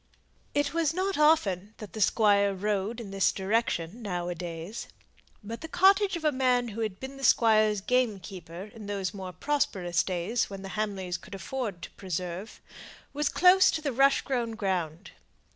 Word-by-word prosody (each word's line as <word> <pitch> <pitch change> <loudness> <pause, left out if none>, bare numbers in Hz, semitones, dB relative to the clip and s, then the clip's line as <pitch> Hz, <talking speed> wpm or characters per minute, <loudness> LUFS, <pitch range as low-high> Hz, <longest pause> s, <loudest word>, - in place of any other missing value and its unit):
It 290 0 +1
was 330 -2 +1
not 380 +1 0
often 220 - +2
that 215 - -10
the 220 - -5
Squire 200 -2 +3
rode 205 +3 -1
in 210 -4 -7
this 195 -1 +2
direction 200 -1 -1
now 180 -4 -3
a - - -1
days; 170 +4 -6 0.6
but 225 +3 -7
the 320 - -6
cottage 385 +3 +4
of 330 -2 -5
a 305 - +4
man 250 -2 +1
who 225 +2 -5
had 215 -4 -3
been 265 +1 -7
the 270 - -10
squire's 215 -4 +4
gamekeeper 195 -6 -2
in 215 -3 -10
those 200 -1 -2
more 190 -2 -6
prosperous 180 - 0
days 185 +6 -1
when 195 -1 -8
the 195 - -6
Hamleys 195 -4 -3
could 195 - -11
afford 200 -2 -4
to - - -7
"preserve," 180 +2 -5 0.5
was 295 0 0
close 370 +1 +6
to 315 - -1
the 280 -4 -1
rush 275 +3 +4
grown 240 -4 -2
ground. 185 -5 -2
210 Hz, 175 wpm, -28 LUFS, 190-265 Hz, 0.6 s, close